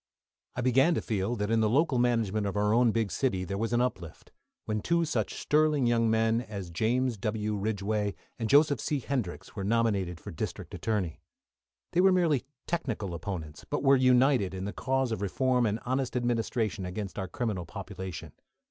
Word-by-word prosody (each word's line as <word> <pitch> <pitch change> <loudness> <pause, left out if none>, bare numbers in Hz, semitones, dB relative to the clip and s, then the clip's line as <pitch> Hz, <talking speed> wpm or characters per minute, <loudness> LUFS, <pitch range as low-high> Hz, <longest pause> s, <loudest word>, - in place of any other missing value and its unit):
I 125 - -2
began 135 +7 +4
to - - 0
feel 105 +1 -1
that 105 -1 -2
in 115 - +3
the 110 -1 +3
local 135 +1 +2
management 110 -4 +1
of 100 - -3
our 105 +1 +2
own 120 +1 +5
big 110 -2 0
city 95 -9 0
there 100 +1 -3
was 115 +1 -1
an 120 0 +2
uplift, 95 -10 -4 0.3
when 105 -1 -1
two 170 +5 +1
such 115 -10 -1
sterling 150 -3 +2
young 115 -1 +3
men 110 +1 +2
as 100 -7 -7
James 120 +6 +1
W. 105 +1 -2
Ridgeway, 105 0 -1 0.2
and 115 -2 -2
Joseph 145 -2 +5
C. 150 - 0
Hendrix, 120 -8 -4
were 100 - -4
nominated 100 -5 +1
for - - -8
District - - -5
Attorney. 100 -8 -2 0.7
They 175 - +3
were 190 0 +6
merely 165 -8 +2 0.2
technical 115 - -2
opponents, 85 -3 -6
but 145 - -3
were 135 0 +6
united 130 -6 +3
in 95 +1 -4
the 105 - -4
cause 130 -1 0
of 110 - -2
reform 125 +4 +1
and 105 +2 -1
honest 130 0 -1
administration 115 -3 -1
against 95 +2 -5
our 95 - -3
criminal 100 -4 -3
population. 95 -3 -7
115 Hz, 185 wpm, -29 LUFS, 100-130 Hz, 0.7 s, were